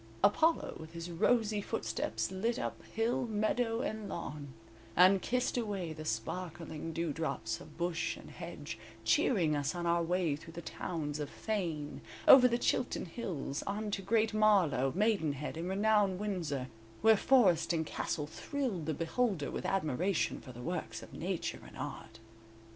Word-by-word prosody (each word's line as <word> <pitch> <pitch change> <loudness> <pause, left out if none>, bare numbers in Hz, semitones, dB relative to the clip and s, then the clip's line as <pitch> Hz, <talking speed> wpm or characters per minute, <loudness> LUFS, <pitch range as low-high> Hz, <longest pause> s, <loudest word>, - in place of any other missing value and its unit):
Apollo 320 +10 +3
with 160 +1 -10
his 170 +1 -6
rosy 215 +4 +2
footsteps 115 - -2
lit 225 +5 0
up - - -3
hill, 230 +2 0
meadow 225 +2 0
and 215 -4 -3
lawn, 150 -3 -5 0.5
and 185 +2 +6
kissed 250 0 0
away 195 -8 -3
the 155 0 -8
sparkling 160 +5 -4
dewdrops 160 -8 -2
of 155 - -13
bush 170 -1 -1
and - - -12
hedge, - - -7 0.3
cheering 170 -11 +3
us 145 +3 -1
on 175 -1 -3
our 170 0 +3
way 170 -2 +1
through 165 +2 -11
the 170 - -6
towns 150 -4 -4
of 145 -2 -3
Thane, 170 -9 -3 0.3
over 260 -2 +10
the 235 -1 +1
Chilton 245 - 0
Hills, 165 - -4
on 210 +1 -2
to 200 - -1
Great 220 +3 +2
Marlow, 180 -12 +4
Maidenhead 160 -10 +1
and 170 +3 -3
renowned 205 -1 +3
Windsor, 165 -11 -2 0.3
where 220 0 +8
forest 195 -9 +4
and 160 -2 0
castle 150 0 -2
thrilled 195 - -3
the 160 - 0
beholder 170 - 0
with - - -3
admiration 180 0 0
for 130 - -10
the 120 0 -9
works 175 +2 -4
of - - -13
Nature - - -3
and - - -13
Art. 110 - -6
175 Hz, 155 wpm, -33 LUFS, 155-215 Hz, 0.5 s, over